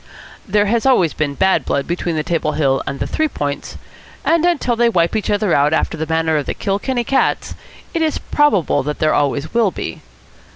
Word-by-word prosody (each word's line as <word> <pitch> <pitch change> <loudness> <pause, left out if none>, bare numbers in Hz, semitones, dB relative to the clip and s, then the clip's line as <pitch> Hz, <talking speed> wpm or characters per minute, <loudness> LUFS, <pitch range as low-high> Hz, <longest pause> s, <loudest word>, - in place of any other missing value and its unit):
There 205 +1 +2
has 230 +4 +1
always 185 - +3
been 145 -2 -2
bad 190 +4 +2
blood 140 - -1
between 175 -1 -2
the 155 - -1
Table 160 -2 -1
Hill 135 -3 +1
and 140 - -4
the - - -1
Three 315 - 0
Points, 145 - -4 0.5
and 330 0 +3
until 300 -9 +1
they 235 0 +3
wipe 170 -2 +1
each 215 - -1
other 205 -3 +1
out 145 +2 +3
after 160 - 0
the 160 0 -4
manner 160 -1 +1
of 145 - -3
the - - -2
Kilkenny 225 +5 -1
cats, 270 +3 0 0.4
it 330 - -1
is 315 -2 +1
probable 205 - +1
that 150 +2 -4
there 155 0 +2
always 145 +1 0
will 230 -3 +3
be. 80 - -6
175 Hz, 205 wpm, -18 LUFS, 150-235 Hz, 0.5 s, always